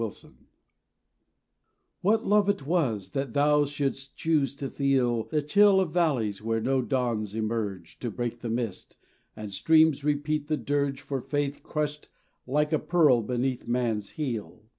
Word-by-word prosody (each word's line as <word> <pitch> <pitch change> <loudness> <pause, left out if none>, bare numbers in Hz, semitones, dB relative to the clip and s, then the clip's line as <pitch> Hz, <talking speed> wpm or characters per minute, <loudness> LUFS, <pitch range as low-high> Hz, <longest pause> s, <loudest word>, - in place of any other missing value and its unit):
XLII 115 - 0 0.2
ATONEMENT - - -27 1.5
WHAT 220 +4 +2
love 205 0 +3
it 195 -9 -1
was 120 - 0
that 135 -1 -3
Thou 145 +1 +4
shouldst 140 -1 -3
choose 150 -4 +1
to 140 -1 -5
feel 125 -5 +1
The 150 -2 -1
chill 200 +5 +5
of 175 -5 -1
valleys 130 - +1
where 115 +1 -1
no 130 +3 +1
dawns 120 -5 -1
emerge 110 -6 -3
To 120 - -3
break 120 +1 -4
the 115 - -5
mist, 115 -4 -4 0.4
and 105 -2 -7
streams 155 +7 +4
repeat 150 0 -1
the 155 -1 0
dirge 140 -2 -1
For 135 -2 -4
faith 145 0 -2
crushed 150 -1 -3 0.4
like 150 +4 +1
a 155 - +3
pearl 150 -9 +4
beneath 125 +3 -2
man's 115 -4 -1
heel. 115 -7 -4
135 Hz, 155 wpm, -27 LUFS, 115-150 Hz, 1.5 s, chill